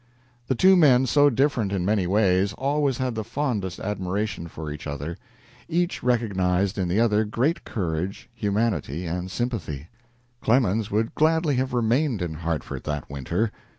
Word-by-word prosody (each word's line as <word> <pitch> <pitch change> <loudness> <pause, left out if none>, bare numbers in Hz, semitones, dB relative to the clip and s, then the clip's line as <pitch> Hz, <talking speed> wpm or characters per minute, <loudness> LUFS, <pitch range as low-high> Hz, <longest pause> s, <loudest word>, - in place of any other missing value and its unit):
The 130 - +1
two 190 +9 +6
men, 135 -7 +5
so 145 +2 +5
different 130 -5 +1
in 95 -3 -1
many 100 -2 +1
ways, 95 -1 +2
always 140 -1 0
had 130 -2 -1
the 110 -1 -3
fondest 110 -7 -2
admiration 100 -2 -3
for 80 -2 -7
each 75 +1 -7
other; 75 +3 -4 0.5
each 175 +1 0
recognized 100 -5 +1
in 90 - 0
the 90 +5 +1
other 110 -2 +3
great 120 +9 0
courage, 90 -1 -3
humanity, 100 - -1
and 90 +2 -3
sympathy. 90 - -3 0.5
Clemens 110 -3 +2
would 110 +2 0
gladly 160 -2 +2
have 130 +1 0
remained 120 - +1
in 85 -3 -3
Hartford 80 -1 -4
that 75 -1 -4
winter. 85 - -1
105 Hz, 150 wpm, -25 LUFS, 90-125 Hz, 0.5 s, two